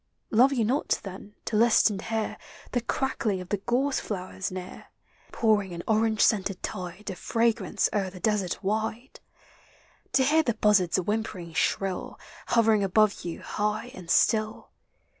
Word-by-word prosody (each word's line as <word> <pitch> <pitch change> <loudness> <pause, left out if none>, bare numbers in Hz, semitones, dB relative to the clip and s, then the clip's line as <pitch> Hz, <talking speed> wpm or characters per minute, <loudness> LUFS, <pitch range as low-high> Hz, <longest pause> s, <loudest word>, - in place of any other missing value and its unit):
Love 250 +5 +5
you 240 -5 +1
not, 260 +7 0
then, 200 +1 -9
to 220 - -2
list 225 0 +5
and 195 -2 -4
hear 220 -1 -2 0.4
The 245 - 0
crackling 230 -6 -1
of 180 0 -9
the 205 - 0
gorse 255 +7 0
flowers 190 -1 -5
near, 185 0 -8 0.4
Pouring 210 -5 +1
an 170 0 -6
orange 220 0 +2
scented 195 -3 +2
tide 185 +3 -5
Of 180 - -9
fragrance 225 -3 +1
o'er 195 -3 0
the 185 0 -11
desert 205 -1 -1
wide? 220 +5 -3 0.9
To 265 - +4
hear 305 +4 +4
the 235 -8 -1
buzzard's 200 -5 +3
whimpering 185 -3 -3
shrill, 190 +3 -1 0.3
Hovering 220 -3 +3
above 205 +2 +2
you 170 -1 -6
high 210 +3 -2
and 180 -2 -11
si 220 - +5
ill? 215 0 -7
210 Hz, 155 wpm, -27 LUFS, 190-225 Hz, 0.9 s, Love